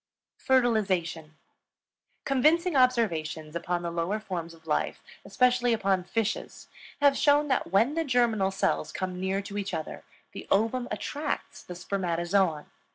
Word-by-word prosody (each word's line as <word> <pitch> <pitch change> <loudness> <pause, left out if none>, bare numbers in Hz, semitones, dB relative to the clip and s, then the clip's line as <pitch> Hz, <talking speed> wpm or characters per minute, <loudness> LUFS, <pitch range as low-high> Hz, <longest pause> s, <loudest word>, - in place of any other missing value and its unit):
FERTILIZATION. 190 - +1 0.9
Convincing 310 +6 +2
observations 170 - +1
upon 175 +1 -2
the 170 - -3
lower 170 +5 -1
forms 170 -5 -6
of 160 0 -22
life, 155 - -1 0.2
especially 245 -1 +2
upon 195 -4 +1
fishes, 220 +2 -3 0.3
have 285 -1 +5
shown 290 +1 +3
that 260 - 0
when 225 +9 +3
the 330 +1 0
germinal 240 -8 +2
cells 195 - -1
come 185 -1 -4
near 190 +1 -1
to 205 +1 -5
each 200 0 -3
other, 155 - -6 0.3
the - - -9
ovum 230 +5 +1
attracts 290 +8 -4
the 180 - -9
spermatozoon. 175 -2 0
200 Hz, 135 wpm, -28 LUFS, 175-250 Hz, 0.9 s, have